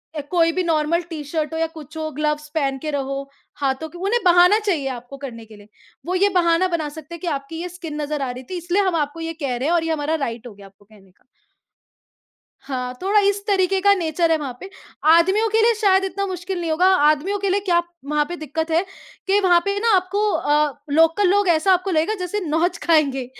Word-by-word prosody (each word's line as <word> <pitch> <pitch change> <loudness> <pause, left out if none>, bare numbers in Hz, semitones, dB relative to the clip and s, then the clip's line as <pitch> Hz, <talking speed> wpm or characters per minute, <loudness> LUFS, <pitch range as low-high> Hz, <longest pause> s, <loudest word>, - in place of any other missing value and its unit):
अ, 300 - -2
कोई 330 -2 +3
भी 370 +2 -1
normal 330 0 +1
T-shirt 310 0 -4
हो 320 - -2
या 325 - +1
कुछ 305 0 -10
हो 315 0 -3
ग्लव्स 300 0 -1
पहन 275 -3 0
के 305 - -2
रहो 275 -1 -3 0.4
हाथों 275 +3 -1
के 350 - -12
उन्हें 405 +7 0
बहाना 360 +4 +6
चाहिए 350 -11 -1
आपको 245 +3 -11
करने 240 -5 -8
के 220 -1 -15
लिए। 205 0 -16 0.4
वो 365 +1 -2
ये 400 +2 +3
बहाना 340 +1 +2
बना 310 -2 -3
सकते 315 +3 -10
हैं - - -11
कि 360 - -5
आपकी 325 +4 -8
ये 360 - -5
स्किन 325 -4 -7
नज़र 295 0 -3
आ 265 -2 -2
रही 255 +1 -9
थी 370 - -4
इसलिए 350 +3 0
हम 365 - 0
आपको 300 +1 -2
ये 330 0 -4
कह 255 -2 -1
रहे 260 +4 -2
हैं 335 - +2
और 330 - +1
ये 325 - -2
हमारा 305 +1 -1
राइट 235 +1 -6
हो 225 - -11
गया 200 0 -15
आपको 195 +1 -23
कहने 200 -3 -21
का। - - -35 1.4
हाँ, 250 -2 -4
थोड़ा 405 +2 +3
इस 405 0 -2
तरीक़े 380 -1 +2
का 400 +1 +5
नेचर 330 -1 0
है 320 - +3
वहाँ 270 -5 -6
पे, 380 - -9 0.4
आदमियों 380 +7 +4
के 440 +1 +2
लिए 465 +1 +4
शायद 385 -2 +4
इतना 395 +1 -2
मुश्किल 365 0 -4
नहीं 330 - -2
होगा, 335 +4 +2
आदमियों 305 +5 +2
के 395 0 -1
लिए 390 +2 +2
क्या 345 -2 +3 0.3
वहाँ 300 0 +1
पे 350 - -4
दिक्कत 320 +1 -4
है 330 +3 +2 0.4
कि 395 +1 +3
वहाँ 360 -3 +4
पे 400 0 -1
ना 460 - +1
आपको 400 +3 0
अ, 295 -3 +1 0.2
लोकल 325 +6 +3
लोग 405 0 +2
ऐसा 340 +3 +4
आपको 370 +1 0
लगेगा 325 +5 +1
जैसे 360 +3 -2
नोच 335 +3 0
खाएँगे, 285 -6 +2
330 Hz, 235 wpm, -21 LUFS, 295-370 Hz, 1.4 s, बहाना